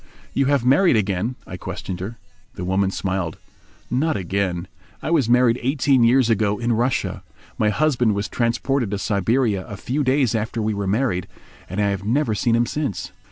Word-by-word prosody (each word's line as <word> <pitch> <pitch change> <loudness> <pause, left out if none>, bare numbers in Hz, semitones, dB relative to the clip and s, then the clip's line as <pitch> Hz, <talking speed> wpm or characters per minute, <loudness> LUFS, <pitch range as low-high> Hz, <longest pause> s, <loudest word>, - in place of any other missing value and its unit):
"You 135 -1 +2
have 140 -4 +2
married 140 +5 +5
again?" 105 +3 0
I 90 - -7
questioned 90 +1 -6
her. 105 +6 -6 0.4
The 90 - -5
woman 95 +1 +1
smiled. 95 -4 -2 0.5
"Not 150 +5 +1
again. 95 -1 -2 0.3
I - - -4
was 145 -9 +2
married 125 0 +4
eighteen 135 -1 +2
years 125 +1 +4
ago 105 -2 +1
in 120 +2 0
Russia. 120 +3 0 0.4
My 105 - +3
husband 125 -3 +2
was 100 +1 -2
transported 120 +1 0
to 100 - -2
Siberia 105 +1 +1
a 105 - -7
few 140 +8 -1
days 130 -3 +2
after 110 +1 -2
we 110 0 0
were 100 -1 -3
married, 100 -3 0 0.4
and 95 +4 -4
I 100 -1 +2
have 100 -1 -2
never 120 +2 +1
seen 115 +2 +1
him 120 +1 +3
since." 145 - -3
115 Hz, 180 wpm, -22 LUFS, 100-130 Hz, 0.5 s, married